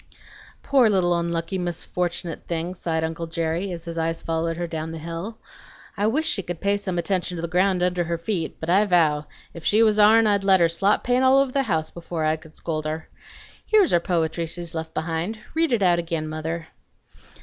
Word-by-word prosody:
"Poor 260 -5 +4
little 185 -3 +2
onlucky 170 +2 -1
misfortunate 175 -1 -3
thing!" 170 +1 -2
sighed 165 -3 -2
uncle 165 +1 -3
Jerry, 165 +3 -2
as 170 -1 -7
his 170 -1 -4
eyes 165 0 -1
followed 165 0 -1
her 175 - -2
down 160 -1 -4
the 165 - -6
hill. 170 +7 -6 0.6
"I 205 +1 +1
wish 305 +8 +1
she 195 - 0
could 175 -2 -6
pay 200 0 +1
some 190 -3 -4
attention 180 0 -1
to 165 - -4
the - - -1
ground 180 +1 +2
under 180 -1 +1
her 170 0 -2
feet; 170 -1 -3
but 160 - -5
I 190 +4 +4
vow, 155 -6 +2 0.3
if 170 - -10
she 215 +6 +4
was 215 -1 +3
ourn 220 +2 +7
I'd 205 -2 +2
let 190 -1 +5
her 170 -1 +4
slop 195 +5 +1
paint 250 +1 +2
all 260 +1 +6
over 275 -1 +3
the 275 - +1
house 160 -3 0
before 170 -2 -4
I 155 0 +2
could 160 0 -15
scold 155 -2 -3
her. 155 +1 -4 0.5
Here's 425 -5 +4
her 175 - +5
poetry 165 -1 -1
she's 170 0 -5
left 160 0 -5
behind. 165 +6 -2 0.2
Read 325 -1 +1
it 230 -5 +2
out 175 -2 +4
ag'in, 165 -2 -2
mother. 155 +1 -4
170 Hz, 210 wpm, -24 LUFS, 165-195 Hz, 0.6 s, ourn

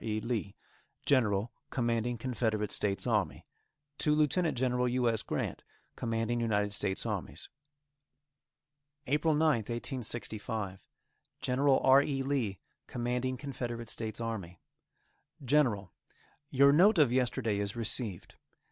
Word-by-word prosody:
E. 110 -1 -1
LEE, 110 -3 -3 0.5
General 115 -5 +2 0.2
Commanding 120 -1 0
Confederate 110 -3 -1
States 100 -1 0
Army. - - 0 0.5
To 150 -1 +3
Lieut. 150 -2 +3 0.2
Gen. 125 +1 +1 0.2
U. 125 0 +1
S. 110 -2 +1
Grant, - - -3 0.3
Commanding 115 0 -1
United 105 -3 +1
States 100 -2 -1
Armies. - - -4 1.6
APRIL 150 +3 +2
9th, 150 -9 +2
1865. 110 -4 -4 0.6
Gen. 125 +1 -1
R. 135 -1 +6
E. 135 -2 -1
Lee, 130 -8 -1 0.3
Commanding 125 +1 -2
Confederate 120 -4 -5
States 110 -1 -4
Army: 105 -7 -5 0.9
GENERAL: 120 - +2 0.6
Your 140 +1 +5
note 195 +7 +6
of 145 -6 +5
yesterday 120 -4 +1
is 100 +1 -2
received. 110 -4 -3
120 Hz, 110 wpm, -31 LUFS, 110-130 Hz, 1.6 s, R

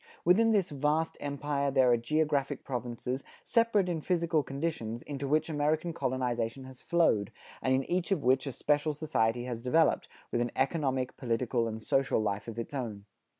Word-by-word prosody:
Within 210 +7 +5
this 200 -7 +2
vast 150 +3 0
empire 140 0 -1
there 130 -2 +4
are - - +6
geographic 145 +2 0
provinces, 125 +1 -4 0.2
separate 230 -5 +2
in 170 -3 -2
physical 170 -2 +1
conditions, 135 -6 -3
into 140 -1 -4
which 155 +3 +2
American 155 +2 0
colonization 125 -3 -2
has 130 0 -12
flowed, 160 - +2 0.3
and 130 - 0
in 135 - +1
each 180 +5 -1
of 180 -7 +1
which 130 +2 +3
a - - -2
special 150 +3 +1
society 120 -6 0
has 120 -2 -4
developed, 155 +6 +2 0.2
with 120 - +1
an 120 - 0
economic, 130 -2 0
political 120 -1 0
and 110 0 -5
social 135 -3 +2
life 105 -1 -2
of 115 -1 -6
its 115 +4 -5
own. 110 -7 -4
135 Hz, 170 wpm, -30 LUFS, 120-155 Hz, 0.3 s, are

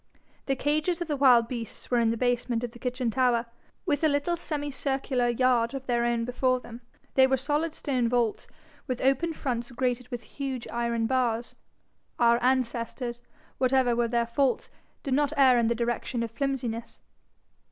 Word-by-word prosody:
The 270 - +1
cages 305 +6 0
of 345 - -3
the 300 - -1
wild 250 -4 +5
beasts 235 -1 -7
were 245 - +4
in 230 -1 +3
the 230 - 0
basement 245 -1 0
of 240 - -3
the 240 - -14
kitchen 250 -2 -2
tower, 245 -1 +2 0.4
with 295 +2 0
a - - +6
little 285 +4 +1
semicircular 275 -5 -2
yard 240 0 +2
of 265 -1 -6
their 240 -2 +1
own 235 -1 0
before 255 +1 +1
them. 240 -1 -11 0.3
They 265 -1 +6
were 265 0 +2
solid 295 +5 -1
stone 255 -4 0
vaults, 240 -3 0 0.4
with 255 -2 -2
open 270 +6 +2
fronts 240 -4 -3
grated 250 0 -1
with 245 -1 -6
huge 265 -3 -5
iron 235 -1 -1
bars 240 -2 0 0.6
our 235 0 +4
ancestors, 240 -1 -1 0.4
whatever 255 -2 +3
were 235 0 +1
their 235 0 +1
faults, 260 +3 0 0.3
did 275 - -1
not 290 +2 +2
err 260 -3 +6
in 230 - +2
the 235 - +1
direction 235 +1 -2
of 230 - -4
flimsiness. 240 -3 -3
250 Hz, 175 wpm, -27 LUFS, 235-270 Hz, 0.6 s, a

